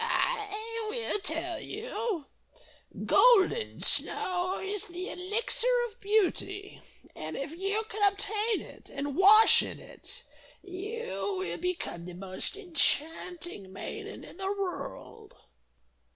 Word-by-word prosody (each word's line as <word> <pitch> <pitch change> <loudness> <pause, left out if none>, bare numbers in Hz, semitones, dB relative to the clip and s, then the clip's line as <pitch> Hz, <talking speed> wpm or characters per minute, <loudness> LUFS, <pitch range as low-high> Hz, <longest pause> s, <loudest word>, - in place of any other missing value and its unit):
"I 450 -1 -1
will 460 -2 +2
tell 345 -2 -1
you! 430 - -3 0.8
Golden 465 -2 +5
Snow 365 +1 +2
is 400 +1 -1
the 360 +1 -4
Elixir 415 +6 0 0.2
of 430 - -18
Beauty, 400 -1 0 0.3
and - - -5
if 275 +1 -4
you 390 +6 -1
can 415 -2 +3
obtain 420 +2 -1
it, - - -13
and 280 0 -3
wash 420 +5 +8
in - - -5
it, - - -10 0.4
you 365 - -4
will 175 -2 -3
become 350 - -3
the 180 -1 -8
most 185 - -3
enchanting 325 - -1
maiden 415 - -7
in - - -12
the 385 0 -1
world." 395 -3 -5
390 Hz, 115 wpm, -30 LUFS, 340-430 Hz, 0.8 s, wash